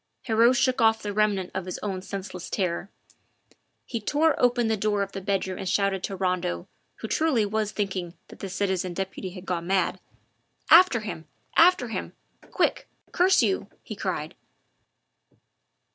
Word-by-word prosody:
Heriot 230 Hz, +1 st, +4 dB
shook 255 Hz, 0 st, +2 dB
off 225 Hz, 0 st, +3 dB
the 205 Hz, -1 st, -3 dB
remnant 205 Hz, -3 st, +1 dB
of 190 Hz, -, -3 dB
his 185 Hz, -, -4 dB
own 195 Hz, -3 st, -3 dB
senseless 190 Hz, -2 st, -7 dB
terror; 185 Hz, -1 st, -2 dB, 1.0 s
he 230 Hz, -2 st, -4 dB
tore 300 Hz, +7 st, +2 dB
open 245 Hz, -1 st, +3 dB
the 220 Hz, -, +2 dB
door 205 Hz, -1 st, 0 dB
of 195 Hz, -, -7 dB
the 195 Hz, -, -6 dB
bedroom 190 Hz, -1 st, -2 dB
and 190 Hz, -, -3 dB
shouted 195 Hz, -1 st, +1 dB
to 195 Hz, -, -5 dB
Rondeau, 180 Hz, -, -1 dB, 0.3 s
who -, -, -7 dB
truly 270 Hz, -5 st, +2 dB
was 215 Hz, 0 st, -1 dB
thinking 190 Hz, -4 st, -3 dB
that -, -, -13 dB
the 195 Hz, -, -5 dB
citizen 185 Hz, -2 st, -1 dB
deputy 190 Hz, 0 st, -4 dB
had 180 Hz, 0 st, -10 dB
gone 175 Hz, -2 st, -3 dB
mad: 190 Hz, -2 st, +1 dB, 0.7 s
"After 335 Hz, -9 st, +7 dB
him! 165 Hz, -7 st, -7 dB, 0.3 s
after 335 Hz, -8 st, +5 dB
him! -, -, -5 dB, 0.4 s
Quick! -, -, 0 dB, 0.2 s
curse 375 Hz, +1 st, +4 dB
you!" 380 Hz, -, 0 dB, 0.2 s
he -, -, -7 dB
cried. -, -, -3 dB
200 Hz, 160 wpm, -26 LUFS, 185-225 Hz, 1.0 s, After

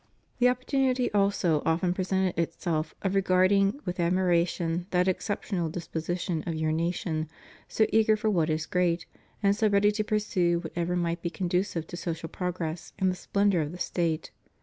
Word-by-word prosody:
The 250 Hz, 0 st, +6 dB
opportunity 255 Hz, 0 st, +1 dB
also 195 Hz, -6 st, +2 dB
often 175 Hz, +2 st, +1 dB
presented 190 Hz, 0 st, 0 dB
itself 165 Hz, -1 st, -2 dB
of 195 Hz, -1 st, 0 dB
regarding 195 Hz, +3 st, +3 dB
with 180 Hz, 0 st, -4 dB
admiration 175 Hz, -1 st, +1 dB
that 180 Hz, -1 st, +2 dB
exceptional 190 Hz, -2 st, -1 dB
disposition 170 Hz, 0 st, -3 dB
of 165 Hz, -, -1 dB
your 155 Hz, 0 st, 0 dB
nation, 160 Hz, -1 st, -1 dB, 0.4 s
so 220 Hz, -, +2 dB
eager 220 Hz, -1 st, +4 dB
for 215 Hz, 0 st, 0 dB
what 165 Hz, -5 st, +1 dB
is 155 Hz, 0 st, -1 dB
great, 175 Hz, -1 st, 0 dB, 0.4 s
and 200 Hz, 0 st, +4 dB
so 220 Hz, 0 st, +2 dB
ready 200 Hz, +1 st, +4 dB
to 215 Hz, +1 st, -1 dB
pursue 205 Hz, -5 st, +1 dB
whatever 175 Hz, +1 st, -2 dB
might 170 Hz, -1 st, -1 dB
be 170 Hz, -, -2 dB
conducive 180 Hz, -1 st, -1 dB
to 175 Hz, -, -8 dB
social 165 Hz, -1 st, -4 dB
progress 175 Hz, -2 st, -4 dB
and 190 Hz, -1 st, +2 dB
the -, -, -4 dB
splendor 200 Hz, -1 st, +1 dB
of 150 Hz, 0 st, -3 dB
the -, -, -7 dB
State. 170 Hz, -3 st, -1 dB
180 Hz, 165 wpm, -28 LUFS, 170-200 Hz, 0.4 s, The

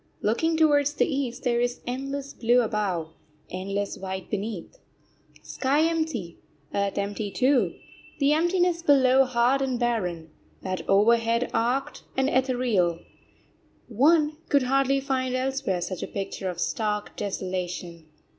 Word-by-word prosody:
Looking 320 Hz, +10 st, +1 dB
towards 290 Hz, -2 st, +3 dB
the -, -, +3 dB
East, 270 Hz, -4 st, -3 dB
there 240 Hz, -2 st, +1 dB
is 245 Hz, 0 st, -1 dB
endless 275 Hz, +2 st, -4 dB
blue 240 Hz, +1 st, +3 dB
above, 195 Hz, -7 st, -2 dB, 0.4 s
endless 195 Hz, +2 st, -3 dB
white 190 Hz, -1 st, -6 dB
beneath. 210 Hz, -3 st, -4 dB, 0.6 s
Sky 280 Hz, +3 st, 0 dB
empty, 315 Hz, -, -2 dB, 0.3 s
earth 200 Hz, -1 st, -1 dB
empty 205 Hz, +1 st, -2 dB
too 260 Hz, +5 st, +2 dB, 0.4 s
the 285 Hz, 0 st, +3 dB
emptiness 345 Hz, +1 st, +2 dB
below 270 Hz, -4 st, +5 dB
hard 255 Hz, +2 st, +2 dB
and 260 Hz, -2 st, 0 dB
barren, 180 Hz, -10 st, -1 dB, 0.3 s
that 185 Hz, 0 st, -3 dB
overhead 230 Hz, +4 st, +3 dB
arched 265 Hz, +5 st, 0 dB, 0.2 s
and 265 Hz, +1 st, +2 dB
ethereal 245 Hz, -10 st, +1 dB, 0.9 s
one 300 Hz, +6 st, +3 dB
could 280 Hz, -2 st, +4 dB
hardly 275 Hz, +1 st, +2 dB
find 260 Hz, -2 st, -1 dB
elsewhere 260 Hz, -7 st, -1 dB
such 180 Hz, +1 st, -4 dB
a -, -, -3 dB
picture 195 Hz, -1 st, -4 dB
of 175 Hz, -1 st, -6 dB
stark 210 Hz, -2 st, -2 dB
desolation. 180 Hz, -4 st, -4 dB
245 Hz, 125 wpm, -26 LUFS, 200-275 Hz, 0.9 s, below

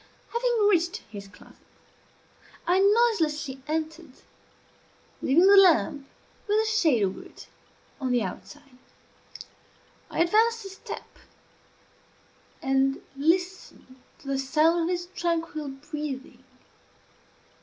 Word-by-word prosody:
Having 470 Hz, -3 st, +2 dB
reached 350 Hz, -3 st, +2 dB
his 200 Hz, -2 st, -8 dB
closet, 195 Hz, -, -18 dB, 1.1 s
I 360 Hz, +2 st, +3 dB
noiselessly 335 Hz, -, +2 dB
entered, 315 Hz, -1 st, -4 dB, 1.1 s
leaving 325 Hz, +7 st, +4 dB
the 400 Hz, +1 st, +7 dB
lamp, 285 Hz, -, +4 dB, 0.4 s
with 420 Hz, +1 st, +2 dB
a 440 Hz, -, +1 dB
shade 335 Hz, -, +2 dB
over 190 Hz, -1 st, -2 dB
it, -, -, -14 dB, 0.5 s
on 260 Hz, -3 st, -2 dB
the 245 Hz, -2 st, +2 dB
outside. 275 Hz, -1 st, -9 dB, 1.3 s
I -, -, -1 dB
advanced 450 Hz, +4 st, +2 dB
a -, -, -6 dB
step, 385 Hz, -, -10 dB, 1.4 s
and 270 Hz, 0 st, +1 dB, 0.2 s
listened 340 Hz, -2 st, -2 dB, 0.3 s
to 275 Hz, -, -14 dB
the 275 Hz, -1 st, -1 dB
sound 315 Hz, +5 st, +2 dB
of -, -, -2 dB
his 350 Hz, -1 st, -2 dB
tranquil 330 Hz, -3 st, -2 dB
breathing. 285 Hz, 0 st, -7 dB
320 Hz, 105 wpm, -26 LUFS, 270-375 Hz, 1.4 s, the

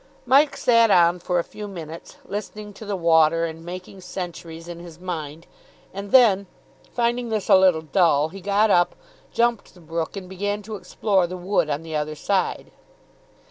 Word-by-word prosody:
Mike 275 Hz, +4 st, +4 dB
sat 230 Hz, -2 st, +4 dB
on 175 Hz, -2 st, +4 dB
for 180 Hz, +1 st, -1 dB
a 170 Hz, -, +1 dB
few 210 Hz, +4 st, -9 dB
minutes, 165 Hz, -4 st, -9 dB
listening 210 Hz, +1 st, -6 dB
to 215 Hz, -, -11 dB
the 205 Hz, -1 st, -2 dB
water 165 Hz, -1 st, +3 dB
and 165 Hz, 0 st, -7 dB
making 185 Hz, +2 st, -9 dB
centuries 170 Hz, -2 st, -7 dB
in 170 Hz, -1 st, -8 dB
his 170 Hz, -1 st, -12 dB
mind, 165 Hz, -3 st, -6 dB, 0.5 s
and 200 Hz, +1 st, -6 dB
then, 205 Hz, -7 st, +5 dB, 0.4 s
finding 240 Hz, 0 st, -1 dB
this 215 Hz, -3 st, -2 dB
a -, -, +8 dB
little 185 Hz, -4 st, +4 dB
dull, 155 Hz, -3 st, +2 dB
he 195 Hz, +3 st, -10 dB
got 205 Hz, +2 st, +2 dB
up, 175 Hz, -1 st, +3 dB, 0.4 s
jumped 235 Hz, -4 st, 0 dB
the -, -, -16 dB
brook, 165 Hz, +2 st, -4 dB
and 190 Hz, -2 st, -7 dB
began 205 Hz, +3 st, -3 dB
to 215 Hz, +1 st, -6 dB
explore 195 Hz, -2 st, 0 dB
the 185 Hz, +1 st, -6 dB
wood 180 Hz, -3 st, 0 dB
on 145 Hz, +2 st, -2 dB
the 160 Hz, -1 st, -6 dB
other 150 Hz, 0 st, -2 dB
side. 185 Hz, +4 st, -1 dB
185 Hz, 180 wpm, -23 LUFS, 165-205 Hz, 0.5 s, a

